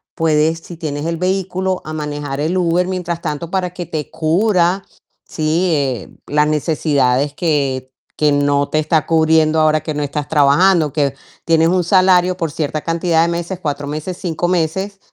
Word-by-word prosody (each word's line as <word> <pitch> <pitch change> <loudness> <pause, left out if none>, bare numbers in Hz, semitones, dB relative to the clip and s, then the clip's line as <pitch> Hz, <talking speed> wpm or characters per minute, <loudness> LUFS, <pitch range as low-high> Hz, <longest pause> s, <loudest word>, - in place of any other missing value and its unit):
puedes 160 0 +1
si 175 - -11
tienes 150 -2 -4
el 165 0 -1
vehículo, 185 0 -1
a 155 - -6
manejar 145 -2 -4
el 165 +5 0
Uber, 180 +1 +1
mientras 175 -2 -3
tanto, 155 +1 -4
para 185 -2 -1
que 180 -1 -5
te 155 -3 -5
cubra, 180 +2 +1 0.4
¿sí?, 165 +3 0
eh, 130 -8 -1 0.2
las 150 0 +2
necesidades 145 -3 +1
que 140 -5 -1 0.3
que 150 -1 +3
no 145 0 +2
te 155 - 0
está 155 0 +1
cubriendo 160 -1 +3
ahora, 155 0 +3
que 155 - -4
no 150 0 -2
estás 145 +1 -3
trabajando. 155 +2 +3
Que 140 -2 0 0.3
tienes 165 0 +3
un 180 -1 +1
salario, 185 0 +4
por 165 -4 -3
cierta 155 0 -3
cantidad 165 0 +1
de 170 - +2
meses, 175 +2 -4
4 145 -2 -3
meses, 155 +5 -5
5 175 -1 -2
meses, 185 +3 -1
160 Hz, 170 wpm, -17 LUFS, 150-175 Hz, 0.4 s, salario